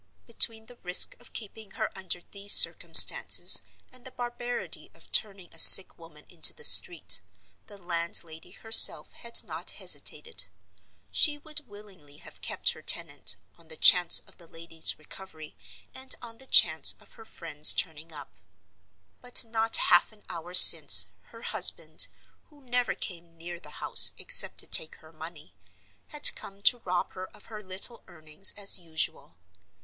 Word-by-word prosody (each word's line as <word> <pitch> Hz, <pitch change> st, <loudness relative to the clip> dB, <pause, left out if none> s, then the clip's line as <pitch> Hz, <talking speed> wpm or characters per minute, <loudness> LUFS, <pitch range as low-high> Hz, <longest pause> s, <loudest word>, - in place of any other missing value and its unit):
Between 225 Hz, -1 st, -1 dB
the 245 Hz, +1 st, -18 dB
risk 180 Hz, -3 st, -1 dB
of -, -, -17 dB
keeping 215 Hz, -1 st, -13 dB
her -, -, -8 dB
under 185 Hz, -2 st, -9 dB
these 200 Hz, 0 st, +2 dB
circumstances, -, -, +6 dB, 0.3 s
and 255 Hz, -1 st, -22 dB
the 260 Hz, -, -14 dB
barbarity 245 Hz, -1 st, -11 dB
of -, -, -22 dB
turning 195 Hz, -5 st, -3 dB
a 165 Hz, -, -12 dB
sick 190 Hz, -, +7 dB
woman 160 Hz, -3 st, -21 dB
into 170 Hz, -3 st, -4 dB
the 470 Hz, -, -12 dB
street, -, -, +3 dB, 0.5 s
the 205 Hz, -, -17 dB
landlady 170 Hz, -2 st, -7 dB
herself 225 Hz, 0 st, +2 dB
had 235 Hz, 0 st, -5 dB
not -, -, -10 dB
hesitated. 470 Hz, -, -5 dB, 0.6 s
She 295 Hz, -1 st, 0 dB
would 300 Hz, -2 st, -12 dB
willingly 195 Hz, -9 st, -18 dB
have -, -, -20 dB
kept -, -, -5 dB
her -, -, -16 dB
tenant, -, -, -2 dB, 0.2 s
on 165 Hz, -, -21 dB
the 160 Hz, 0 st, -11 dB
chance 180 Hz, -2 st, +4 dB
of -, -, -20 dB
the 170 Hz, -, -14 dB
lady's 165 Hz, 0 st, -3 dB
recovery, 155 Hz, -1 st, -16 dB, 0.4 s
and 260 Hz, 0 st, -7 dB
on 230 Hz, -1 st, -16 dB
the 265 Hz, -, -17 dB
chance 160 Hz, -8 st, +2 dB
of -, -, -19 dB
her 225 Hz, -, -18 dB
friends 160 Hz, -8 st, +1 dB
turning 160 Hz, -1 st, -7 dB
up. 145 Hz, -, -15 dB, 0.8 s
But 245 Hz, -1 st, -3 dB
not 225 Hz, 0 st, -2 dB
half 175 Hz, +4 st, -1 dB
an 215 Hz, -1 st, -26 dB
hour 175 Hz, +2 st, -11 dB
since, -, -, +7 dB, 0.2 s
her -, -, -20 dB
husband—who 295 Hz, -2 st, -4 dB
never 245 Hz, -1 st, -6 dB
came 170 Hz, -3 st, -11 dB
near 170 Hz, +1 st, -14 dB
the 150 Hz, -, -19 dB, 0.2 s
house, -, -, +2 dB
except -, -, +1 dB
to -, -, -11 dB
take 155 Hz, -, +1 dB
her 155 Hz, +1 st, -24 dB
money—had 100 Hz, -, -5 dB
come 200 Hz, 0 st, -15 dB
to 245 Hz, -, +2 dB
rob 180 Hz, -5 st, -8 dB
her 185 Hz, 0 st, -13 dB
of -, -, -23 dB
her 215 Hz, -, -12 dB
little 195 Hz, +5 st, -7 dB
earnings, 155 Hz, +3 st, -2 dB
as 200 Hz, -2 st, 0 dB
usual. 160 Hz, -, -8 dB
185 Hz, 155 wpm, -23 LUFS, 160-225 Hz, 0.8 s, sick